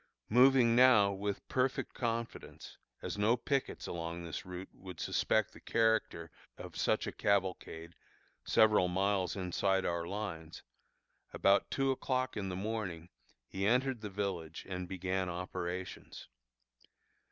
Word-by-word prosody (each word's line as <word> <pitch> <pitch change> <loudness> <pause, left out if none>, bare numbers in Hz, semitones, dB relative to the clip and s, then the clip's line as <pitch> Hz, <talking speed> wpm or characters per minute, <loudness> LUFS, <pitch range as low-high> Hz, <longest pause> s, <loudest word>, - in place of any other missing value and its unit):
Moving 125 0 +6
now 120 -5 +6
with 100 0 -4
perfect 130 +1 0
confidence, 115 -1 -4 0.3
as - - -4
no 110 +4 +3
pickets 135 +2 -2
along 85 0 -5
this 85 +1 -6
route 90 +1 -7
would 90 -3 -10
suspect - - +1
the - - -13
character 110 -8 +1 0.3
of - - -9
such - - +1
a - - -3
cavalcade 90 -4 -1 0.5
several 110 -4 +4
miles 95 -1 0
inside 95 0 0
our 85 -1 -1
lines, 85 -6 -6 0.7
about 100 +1 +3
two 135 -1 +1
o'clock 130 -1 -1
in 95 -2 -3
the 90 - -3
morning 95 -5 -4 0.4
he 95 +1 -2
entered 125 +1 +2
the 105 - -5
village 95 -5 -4
and 90 -1 -4
began 95 0 -2
operations. 90 0 -5
95 Hz, 130 wpm, -33 LUFS, 90-115 Hz, 0.7 s, Moving